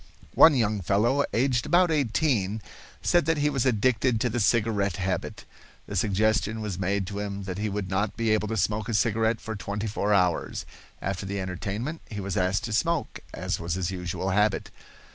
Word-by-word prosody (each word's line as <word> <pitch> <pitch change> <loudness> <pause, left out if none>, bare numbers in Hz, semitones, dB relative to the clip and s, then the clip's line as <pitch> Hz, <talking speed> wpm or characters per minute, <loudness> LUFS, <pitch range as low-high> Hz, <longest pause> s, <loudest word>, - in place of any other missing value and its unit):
One 160 -3 +7
young 110 -4 +1
fellow, 110 +10 +2
aged 120 0 +1
about 175 -1 +4
eighteen, 115 -7 +1 0.4
said 175 -3 +3
that 165 -1 +2
he 150 0 +1
was 135 -2 +1
addicted 120 0 +2
to 125 - +1
the 120 - -1
cigarette 105 -2 +2
habit. 95 0 -3 0.4
The 105 - -7
suggestion 110 +3 +1
was 105 -4 -4
made 95 +1 0
to 100 +2 -5
him 100 -1 -4
that 95 0 -5
he 105 0 -1
would 100 -1 -3
not 95 +3 -1
be 115 -1 +1
able 105 0 +1
to 110 +1 -2
smoke 105 +3 0
a 115 - 0
cigarette 110 0 +2
for 110 0 -5
twenty 100 +1 -4
four 105 -1 -1
hours. 90 -4 +1 0.4
After 95 0 -3
the 100 0 -3
entertainment 100 - -4
he 105 - -5
was 100 -1 -3
asked 95 +2 +1
to 110 - -3
smoke, 165 +6 0
as - - -3
was 85 0 -2
his 95 -1 -2
usual 90 +1 -3
habit. 105 +1 +1
105 Hz, 190 wpm, -26 LUFS, 100-115 Hz, 0.4 s, One